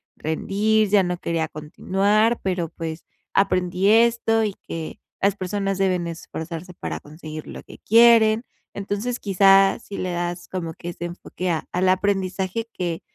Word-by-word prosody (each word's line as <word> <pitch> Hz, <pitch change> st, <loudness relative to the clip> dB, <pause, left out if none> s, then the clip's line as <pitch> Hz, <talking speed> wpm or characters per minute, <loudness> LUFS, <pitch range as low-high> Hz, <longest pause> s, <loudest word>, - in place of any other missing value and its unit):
rendir, 205 Hz, +7 st, +1 dB
ya 200 Hz, -1 st, +4 dB
no 180 Hz, 0 st, -2 dB
quería 165 Hz, -2 st, -1 dB
continuar, 200 Hz, +9 st, +1 dB
pero, 180 Hz, -3 st, -1 dB
pues, 160 Hz, 0 st, -6 dB, 0.3 s
aprendí 185 Hz, -1 st, +1 dB
esto 225 Hz, 0 st, +4 dB
y 210 Hz, -2 st, -1 dB
que 165 Hz, -1 st, -6 dB, 0.2 s
las 200 Hz, 0 st, +2 dB
personas 195 Hz, 0 st, -2 dB
deben 185 Hz, -3 st, +1 dB
esforzarse 170 Hz, +1 st, -7 dB
para -, -, -5 dB
conseguir 155 Hz, 0 st, -9 dB
lo -, -, -8 dB
que -, -, -13 dB
quieren". 230 Hz, 0 st, +5 dB, 0.3 s
Entonces, 205 Hz, +5 st, -3 dB
quizá 195 Hz, 0 st, +5 dB
si 205 Hz, -3 st, -9 dB
le 185 Hz, -, -2 dB
das 175 Hz, 0 st, -3 dB
como 170 Hz, -3 st, -4 dB
que 175 Hz, -, -7 dB
ese 175 Hz, 0 st, -6 dB
enfoque 180 Hz, +1 st, -5 dB
a 160 Hz, -3 st, -1 dB
al 185 Hz, +1 st, +2 dB
aprendizaje 190 Hz, +2 st, 0 dB
que 170 Hz, -2 st, -3 dB
185 Hz, 150 wpm, -23 LUFS, 175-205 Hz, 0.3 s, quieren